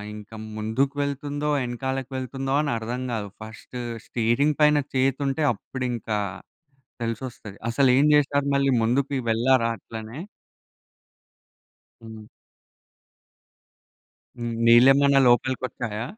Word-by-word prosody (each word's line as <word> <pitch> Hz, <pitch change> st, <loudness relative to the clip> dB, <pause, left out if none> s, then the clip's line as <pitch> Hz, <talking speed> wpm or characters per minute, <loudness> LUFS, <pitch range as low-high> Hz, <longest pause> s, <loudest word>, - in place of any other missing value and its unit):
ఇంకా 105 Hz, +1 st, -11 dB, 0.2 s
ముందుకు 120 Hz, +6 st, -1 dB
వెళ్తుందో, 145 Hz, +1 st, -3 dB
వెనకాలకి 130 Hz, +2 st, -3 dB
వెళ్తుందో 135 Hz, +1 st, -3 dB
అని 150 Hz, -, -1 dB
అర్థం 120 Hz, +3 st, -4 dB
కాదు. 105 Hz, -2 st, -3 dB, 0.2 s
ఫస్ట్ 110 Hz, +3 st, -10 dB, 0.3 s
స్టీరింగ్ 120 Hz, +6 st, +1 dB
పైన 150 Hz, 0 st, +5 dB, 0.2 s
చేతుంటే, 135 Hz, +3 st, +1 dB
అప్పుడింకా 120 Hz, -1 st, -4 dB, 0.9 s
తెలిసొస్తది. 115 Hz, -3 st, -5 dB
అసలేం 130 Hz, +2 st, +4 dB
చేశారు? 145 Hz, -1 st, +2 dB
మళ్ళీ 140 Hz, 0 st, +2 dB
ముందుకి 135 Hz, +5 st, +1 dB
వెళ్ళారా? 115 Hz, +1 st, +3 dB
అట్లనే. 110 Hz, +5 st, -9 dB, 1.9 s
హ్మ్. 110 Hz, -1 st, -10 dB, 2.4 s
నీళ్ళేమన్నా 135 Hz, +4 st, +6 dB
లోపలికి 120 Hz, +2 st, +2 dB
వచ్చాయా? 110 Hz, -3 st, -5 dB
130 Hz, 90 wpm, -24 LUFS, 115-140 Hz, 2.4 s, నీళ్ళేమన్నా